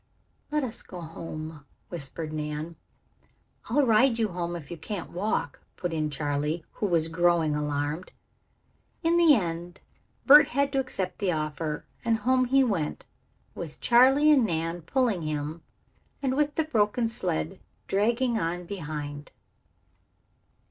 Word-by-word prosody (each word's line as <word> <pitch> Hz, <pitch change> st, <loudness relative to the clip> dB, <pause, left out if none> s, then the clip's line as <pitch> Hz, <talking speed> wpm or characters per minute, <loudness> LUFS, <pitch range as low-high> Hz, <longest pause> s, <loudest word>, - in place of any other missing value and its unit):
"Let 300 Hz, -1 st, +1 dB
us 235 Hz, -3 st, -4 dB
go 180 Hz, -, -10 dB
home," 160 Hz, -2 st, -7 dB, 0.3 s
whispered 155 Hz, -1 st, -4 dB
Nan. 150 Hz, +2 st, -4 dB, 0.9 s
"I'll 280 Hz, +4 st, +3 dB
ride 230 Hz, +1 st, +4 dB
you 220 Hz, -2 st, +1 dB
home 175 Hz, -1 st, -3 dB
if 160 Hz, -3 st, -8 dB
you 170 Hz, -, -5 dB
can't 195 Hz, +4 st, -6 dB
walk," 180 Hz, -5 st, -2 dB, 0.2 s
put 175 Hz, -2 st, -3 dB
in 155 Hz, -1 st, 0 dB
Charley, 150 Hz, +2 st, -2 dB
who 210 Hz, -, -2 dB
was 165 Hz, -3 st, +2 dB
growing 165 Hz, -2 st, +2 dB
alarmed. 150 Hz, +3 st, -2 dB, 0.9 s
In 335 Hz, +1 st, +3 dB
the 330 Hz, -4 st, +7 dB
end 175 Hz, -3 st, -3 dB, 0.5 s
Bert 295 Hz, +2 st, +9 dB
had 280 Hz, +2 st, 0 dB
to 270 Hz, -, +1 dB
accept 195 Hz, -8 st, -3 dB
the 195 Hz, -3 st, +1 dB
offer, 155 Hz, -1 st, -3 dB, 0.2 s
and 230 Hz, -1 st, +2 dB
home 255 Hz, +3 st, +2 dB
he 270 Hz, +2 st, +4 dB
went, 190 Hz, -11 st, -2 dB, 0.5 s
with 160 Hz, -3 st, -7 dB
Charley 265 Hz, +5 st, +6 dB
and 275 Hz, -5 st, +5 dB
Nan 165 Hz, -3 st, -1 dB
pulling 225 Hz, -, +1 dB
him 155 Hz, +1 st, -3 dB, 0.6 s
and 265 Hz, -2 st, 0 dB
with 295 Hz, 0 st, +1 dB
the 320 Hz, -, +2 dB
broken 230 Hz, -4 st, +1 dB
sled 80 Hz, -, -2 dB, 0.3 s
dragging 230 Hz, +4 st, +1 dB
on 175 Hz, +2 st, -2 dB
behind. 150 Hz, -5 st, -6 dB
175 Hz, 140 wpm, -27 LUFS, 155-240 Hz, 0.9 s, Bert